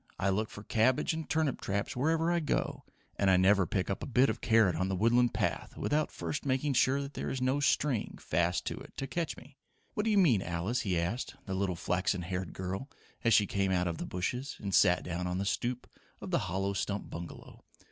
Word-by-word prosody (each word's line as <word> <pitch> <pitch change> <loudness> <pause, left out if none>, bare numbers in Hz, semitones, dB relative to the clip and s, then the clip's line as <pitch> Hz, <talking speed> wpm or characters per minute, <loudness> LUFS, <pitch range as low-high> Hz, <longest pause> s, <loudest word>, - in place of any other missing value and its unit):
"I 100 - +1
look 105 +3 0
for 105 - -10
cabbage 120 +8 +2
and 160 0 -5
turnip 155 -4 0
traps 100 +1 -2
wherever 160 +6 +2
I 175 - +2
go, 155 - -2 0.3
and 100 - +3
I 95 - +6
never 95 0 +4
pick 95 -2 -1
up 100 - -2
a - - -4
bit 130 +1 +4
of - - -7
carrot 110 -7 +4
on 95 +3 -1
the 95 - 0
Woodland 120 +5 +3
path - - -2
without 150 +1 0
first 145 - -4
making 135 +1 0
sure 140 +2 +2
there 140 - -5
is 130 - -2
no 130 +2 +1
string 140 -4 +1
fast 85 +1 0
to - - -3
it, - - -13
to 135 - -2
catch 165 +3 -3
me. 135 +3 -15 0.4
What 210 - -1
do - - +2
you 210 - +3
mean, 140 - +5
Alice?" 90 +8 -1
he 95 -5 0
asked 100 +11 -3
the 95 - -4
little 95 -1 0
flaxen 90 +1 0
haired 90 0 -3
girl 95 +9 -4 0.3
as 115 -3 +5
she 105 - +5
came 100 -1 0
out 90 -1 +2
of 85 -1 -3
the - - -4
bushes 125 +10 -3
and 100 -2 -4
sat 90 -1 +5
down 90 +1 -3
on 90 0 -2
the 100 - -1
stoop 120 +4 -2 0.3
of - - -7
the - - +3
hollow 95 +2 -1
stump 100 +1 -3
bungalow. 85 0 -9
105 Hz, 225 wpm, -31 LUFS, 95-135 Hz, 0.4 s, I